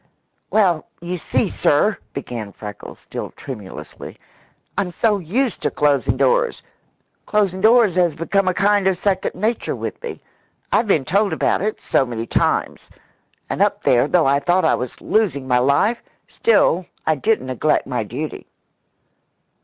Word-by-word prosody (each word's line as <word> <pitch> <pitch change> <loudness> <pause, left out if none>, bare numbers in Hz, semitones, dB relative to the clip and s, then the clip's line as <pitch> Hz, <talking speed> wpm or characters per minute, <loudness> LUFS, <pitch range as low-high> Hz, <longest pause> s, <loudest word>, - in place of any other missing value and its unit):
"Well, 185 -7 +2
you 175 +1 -4
see, - - 0
sir," - - +1
began 110 -5 -6
Freckles, 105 -1 -9
still - - -6
tremulously, 105 -9 -9 0.6
"I'm 195 -3 -1
so 210 +3 +1
used 220 - -1
to - - +1
closin' 145 -3 +1
doors. 485 -1 +1 0.6
Closin' 195 -3 +1
doors 220 -2 +5
has 175 -3 +2
become 185 +4 0
a 185 - +3
kind 205 -1 +3
of 190 -2 +2
second 190 0 -1
nature 215 +6 -1
with - - -6
me. 475 - -6 0.5
I've 230 - +2
been 155 -9 +2
told 200 +3 +1
about 160 - +1
it 215 +2 -2
so - - +1
many 115 -3 -4
times. - - -1 0.6
And - - -3
up - - +1
there, 120 +2 +3
though 170 +1 +3
I 140 +1 +3
thought 175 +5 +2
I - - +4
was 125 -1 -4
losin' 155 -12 0
my 125 -1 +3
life, 145 - +2 0.3
still 185 -5 +2 0.2
I 155 - +3
didn't 210 +3 0
neglect 130 +4 0
my 125 -4 -2
duty." 130 +9 -6
175 Hz, 155 wpm, -20 LUFS, 135-205 Hz, 0.6 s, doors